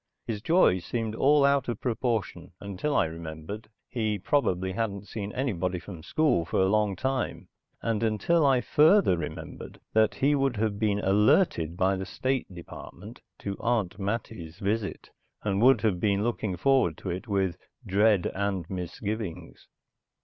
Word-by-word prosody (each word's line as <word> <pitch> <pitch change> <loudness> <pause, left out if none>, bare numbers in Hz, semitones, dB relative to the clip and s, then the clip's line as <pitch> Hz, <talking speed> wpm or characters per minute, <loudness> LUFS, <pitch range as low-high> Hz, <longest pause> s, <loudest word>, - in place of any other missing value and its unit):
His 105 -3 -4
joy 160 - +4
seemed 110 +5 -3
all 140 +4 +4
out 140 0 +2
of 120 - -3
proportion 115 -8 -2
until 100 +9 -3
I - - +4
remembered 80 +6 -7 0.2
he 110 -4 -1
probably 95 -5 0
hadn't 100 -1 -3
seen 105 -2 -5
anybody 95 -9 -1
from 90 -1 -9
school 150 - +1
for 85 - -1
a 95 - +4
long 105 -1 +2
time; 130 +5 -2 0.3
and 115 -2 0
until 115 - +2
I 135 -3 +4
further 155 - +5
remembered 85 -3 -7
that 110 0 +3
he 140 +2 +2
would 135 -4 +1
have 105 -1 -1
been 105 -2 +1
alerted 100 - +2
by 95 +1 +2
the 95 0 -5
State 130 +3 -2
Department 85 -2 -11 0.2
to 100 -1 -3
Aunt 110 -6 -1
Mattie's 100 -5 -4
visit 100 +1 -3 0.3
and 100 -1 0
would 130 +3 +6
have 105 -6 +1
been 100 +1 +1
looking 110 -5 -2
forward 130 - +2
to 95 - -5
it 90 +6 -5
with 95 -4 0 0.3
dread 100 -1 +3
and 95 -3 -2
misgivings. 90 -1 -5
105 Hz, 155 wpm, -27 LUFS, 95-120 Hz, 0.3 s, would